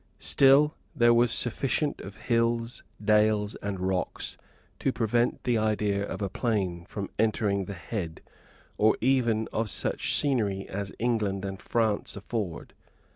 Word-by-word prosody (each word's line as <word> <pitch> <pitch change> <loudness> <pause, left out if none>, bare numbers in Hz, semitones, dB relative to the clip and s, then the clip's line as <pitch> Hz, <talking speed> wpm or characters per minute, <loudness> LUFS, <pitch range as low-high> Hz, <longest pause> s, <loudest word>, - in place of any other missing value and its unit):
Still 140 +3 +5 0.2
there 120 -3 +5
was 120 0 +4
sufficient 135 +5 +1
of 100 +1 -10
hills, 115 0 0 0.2
dales, 105 0 +3
and 100 -2 -4
rocks 95 0 -2 0.4
to 135 - +1
prevent 120 0 0
the 120 -3 +1
idea 105 -2 0
of 100 - -4
a - - 0
plain 95 -5 -2
from 100 +1 -6
entering 105 -3 +1
the 100 - -6
head, 85 -3 -5 0.6
or 110 +1 +4
even 115 -3 +2
of 110 0 0
such - - +1
scenery 105 -9 +1
as 100 0 -4
England 105 -5 -1
and 95 -1 -6
France 110 -3 0
afford. 100 -4 -5
110 Hz, 135 wpm, -27 LUFS, 100-120 Hz, 0.6 s, Still